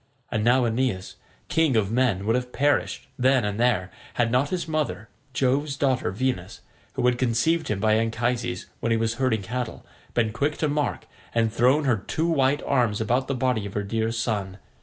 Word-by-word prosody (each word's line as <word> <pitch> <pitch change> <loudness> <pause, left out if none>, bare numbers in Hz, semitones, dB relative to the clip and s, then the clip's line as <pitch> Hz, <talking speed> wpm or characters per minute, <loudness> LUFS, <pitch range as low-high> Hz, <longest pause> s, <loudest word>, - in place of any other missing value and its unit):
And 105 - 0
now 120 +2 +4
Aeneas, 115 -5 -1 0.3
king 160 -6 +2
of 105 -2 +2
men, 115 -6 +1
would 115 +2 +2
have 125 0 -2
perished 145 -1 +1
then 130 -2 +3
and 105 +1 -2
there, 110 -7 +2 0.2
had 115 -1 +1
not 130 +4 +2
his 180 -2 -2
mother, 150 -9 -2 0.2
Jove's 135 +2 0
daughter 130 -3 +1
Venus, 100 -3 -2 0.3
who - - -1
had 125 -1 +2
conceived 130 +7 +1
him 105 -2 -1
by 110 +1 +3
Anchises 115 -2 -1
when 115 - -1
he 115 - +3
was 115 0 0
herding 110 -6 +1
cattle, 125 +3 -4 0.3
been 110 -3 +1
quick 145 +5 -1
to 155 - 0
mark, 145 0 -1 0.3
and 115 -1 +2
thrown 130 +6 +3
her 125 -5 +2
two 160 - -2
white 145 -3 +2
arms 120 -6 +1
about 120 +4 0
the 135 - -1
body 125 -5 0
of 100 - -10
her 105 - 0
dear 110 +2 -1
son. 105 -5 -2
120 Hz, 190 wpm, -25 LUFS, 110-130 Hz, 0.3 s, now